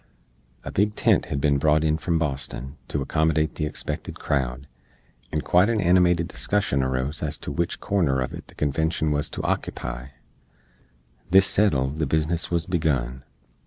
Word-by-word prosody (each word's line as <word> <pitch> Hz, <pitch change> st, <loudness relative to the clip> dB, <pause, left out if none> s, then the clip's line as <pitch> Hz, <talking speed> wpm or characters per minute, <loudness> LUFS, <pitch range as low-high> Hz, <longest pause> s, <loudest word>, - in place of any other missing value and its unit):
A -, -, -6 dB
big 105 Hz, +2 st, +1 dB
tent -, -, +3 dB
hed 70 Hz, -, -3 dB
bin 70 Hz, 0 st, +2 dB
brought 75 Hz, +1 st, +3 dB
on 80 Hz, 0 st, +2 dB
from 85 Hz, +1 st, 0 dB
Boston 70 Hz, -3 st, -3 dB
to 70 Hz, -, -2 dB
accommodate 80 Hz, +2 st, +1 dB
the 75 Hz, -, -2 dB
expected 75 Hz, -, -5 dB
crowd, 65 Hz, -2 st, -2 dB, 0.6 s
and 75 Hz, -1 st, -1 dB
quite 90 Hz, +5 st, +4 dB
an 115 Hz, -2 st, +1 dB
animated 90 Hz, -2 st, +3 dB
discussion 70 Hz, +3 st, 0 dB
arose 65 Hz, +3 st, -1 dB
ez 75 Hz, -2 st, -2 dB
to -, -, -6 dB
wich 85 Hz, +4 st, -2 dB
corner 85 Hz, -10 st, +1 dB
uv 65 Hz, -1 st, -2 dB
it -, -, -9 dB
the -, -, -16 dB
Convenshun 80 Hz, +2 st, 0 dB
wuz 75 Hz, 0 st, 0 dB
to -, -, -5 dB
ockepy. 65 Hz, +1 st, -3 dB, 1.2 s
This 95 Hz, +2 st, +7 dB
settled, 75 Hz, -9 st, +1 dB
the 75 Hz, -, +1 dB
biznis 80 Hz, +3 st, 0 dB
wuz 85 Hz, -2 st, 0 dB
begun. 65 Hz, -8 st, -1 dB
75 Hz, 165 wpm, -24 LUFS, 70-85 Hz, 1.2 s, This